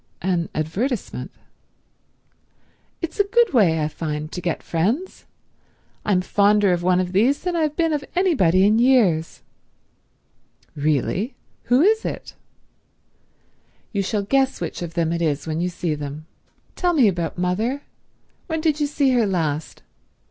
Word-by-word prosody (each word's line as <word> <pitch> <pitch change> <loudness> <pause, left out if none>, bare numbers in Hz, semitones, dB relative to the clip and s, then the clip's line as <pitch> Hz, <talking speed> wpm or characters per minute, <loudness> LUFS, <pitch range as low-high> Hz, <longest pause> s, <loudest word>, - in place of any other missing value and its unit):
"An 175 -2 0
advertisement?" 195 - -3 1.7
"It's 335 +3 -5
a - - +6
good 465 -1 +2
way, 170 -10 +4
I - - +1
find, 155 -1 -5
to 180 - -5
get 170 -2 -2
friends. 220 - -2 0.8
I'm 190 -3 +2
fonder 205 0 +3
of 175 - -1
one 180 +1 +2
of 180 -1 -1
these 235 +9 +2
than 360 -1 -1
I've 310 -3 0
been 330 -2 +1
of 290 -2 -1
anybody 195 - +3
in 215 +2 +4
years." 220 -11 +2 1.3
"Really? 155 - -1 0.3
Who 250 +5 +4
is 440 +3 +3
it?" - - -5 1.6
"You 200 - +1
shall 200 +1 -1
guess 270 +5 +1
which - - -5
of 170 -1 -6
them 165 -1 0
it 170 - -2
is 150 -3 0
when 160 0 -2
you 180 - 0
see 170 -2 -2
them. 150 +1 -6 0.5
Tell 355 -1 +1
me 270 -9 +5
about 175 -4 -2
mother. 215 +11 -1 0.6
When 320 -2 -2
did 310 -1 +1
you 295 - +1
see 285 -2 +1
her 240 -4 +2
last? 160 -5 -2
200 Hz, 150 wpm, -22 LUFS, 170-275 Hz, 1.7 s, a